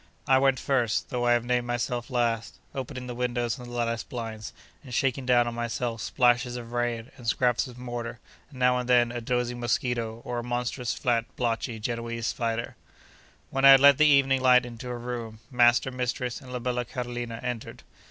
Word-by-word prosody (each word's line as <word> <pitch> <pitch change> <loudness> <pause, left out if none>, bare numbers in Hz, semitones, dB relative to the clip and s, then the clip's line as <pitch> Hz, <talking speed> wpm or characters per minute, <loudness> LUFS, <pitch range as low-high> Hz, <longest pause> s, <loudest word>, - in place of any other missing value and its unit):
I 130 0 +5
went 135 -1 +3
first, 125 -5 0
though 120 -1 0
I 120 - +5
have 120 0 +1
named 120 0 0
myself 120 +1 -2
last, 120 -3 -1 0.2
opening 130 -1 -5
the 125 - -5
windows 120 0 -1
and 125 - -9
the - - -10
lattice 115 -1 -1
blinds, 115 -4 -6 0.3
and 130 - -11
shaking 130 +1 0
down 120 -1 +4
on 120 - -3
myself 120 -1 -3
splashes 120 +2 +2
of 120 -1 -7
rain, 120 0 -2
and 120 -3 -10
scraps 125 +3 +2
of 125 -1 -12
mortar, 120 -1 -5 0.3
and 140 - -14
now 125 0 +3
and 125 0 -5
then 120 -1 +4
a 120 -1 -4
dozing 125 0 -1
mosquito, 120 -1 -1
or 120 -1 -3
a - - -5
monstrous, 120 0 -2
fat, 115 -2 +1
blotchy, 115 -1 -1
Genoese 115 0 -3
spider. 115 0 -2 0.8
When 135 0 -1
I 135 - +10
had 135 0 +10
let 140 +1 +7
the 155 - +6
evening 135 -2 +4
light 125 -1 +5
into 120 +1 -8
a 120 - -3
room, 120 -2 -5
master, 125 +1 +4
mistress, 125 0 -3
and 130 -2 -11
la 125 - -3
bella 125 0 -1
Carolina, 120 -1 -5
entered. 120 -2 -5
120 Hz, 195 wpm, -27 LUFS, 120-125 Hz, 0.8 s, I